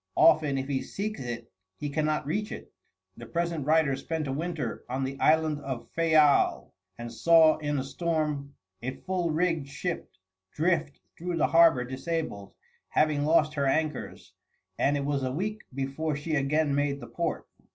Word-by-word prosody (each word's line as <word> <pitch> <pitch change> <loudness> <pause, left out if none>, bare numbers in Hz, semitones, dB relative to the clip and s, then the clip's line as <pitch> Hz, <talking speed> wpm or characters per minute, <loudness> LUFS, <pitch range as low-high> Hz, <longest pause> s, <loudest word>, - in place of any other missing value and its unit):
Often 155 -4 +5
if 135 0 -3
he 135 -2 -1
seeks 215 +2 -4
it 120 -2 -6 0.3
he 150 - -4
cannot 155 0 0
reach 210 +8 -2
it. - - -9 0.4
The - - -9
present 170 -4 -2
writer 155 -3 +3
spent 155 +3 -3
a 135 - -2
winter 155 -4 -3
on 130 +2 -2
the 135 +1 -4
island 155 -1 +3
of 135 -4 -6
Fayal, 155 -3 +3 0.2
and 120 0 -7
saw 165 -2 +5
in 145 -1 -2
a 130 - -1
storm 150 -1 -2 0.3
a 130 +2 -4
full 185 -2 -2
rigged 165 -2 0
ship 170 +6 -4 0.4
drift 160 -2 0 0.2
through 175 0 -3
the - - +3
harbor 165 -6 +5
disabled, 130 -5 -4 0.3
having 150 -2 +2
lost 155 -1 +3
her 140 -2 0
anchors; 155 +1 -2 0.5
and 145 +1 +2
it 140 - -2
was 140 -1 0
a 130 -1 -1
week 210 +9 -3
before 140 +4 -2
she 145 +3 -4
again 150 +1 +1
made 140 0 0
the 120 - -8
port. 170 +6 -3
150 Hz, 165 wpm, -28 LUFS, 135-165 Hz, 0.5 s, Often